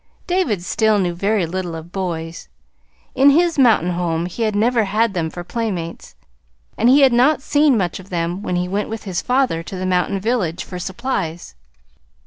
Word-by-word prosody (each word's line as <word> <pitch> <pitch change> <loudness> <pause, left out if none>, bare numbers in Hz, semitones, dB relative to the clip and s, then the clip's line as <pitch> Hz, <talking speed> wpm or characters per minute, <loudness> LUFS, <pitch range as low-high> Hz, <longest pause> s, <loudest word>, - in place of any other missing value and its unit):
David 320 - 0
still 215 +3 +2
knew 180 -3 0
very 195 +2 0
little 175 0 -4
of 165 +1 -9
boys. 170 -3 -5 0.7
In 275 +2 +5
his 330 +2 +3
mountain 220 -9 +4
home 170 -1 -1
he 180 +6 -6
had 215 -2 0
never 230 +1 +2
had 215 +2 +1
them 165 -3 -1
for 175 +2 -7
playmates, 185 -6 -5 0.6
and 240 - +3
he 275 +3 +6
had 265 -3 +5
not 270 +4 +3
seen 290 -4 +3
much 180 -3 -2
of 190 +1 -13
them 175 +1 -2
when 180 - -2
he 180 0 -1
went 200 +3 -2
with 225 0 -6
his 190 -3 -3
father 250 -10 +1
to 175 - -8
the 185 0 -4
mountain 185 +2 0
village 195 -6 -1
for 180 - -8
supplies. 185 - -4
195 Hz, 185 wpm, -19 LUFS, 175-235 Hz, 0.7 s, he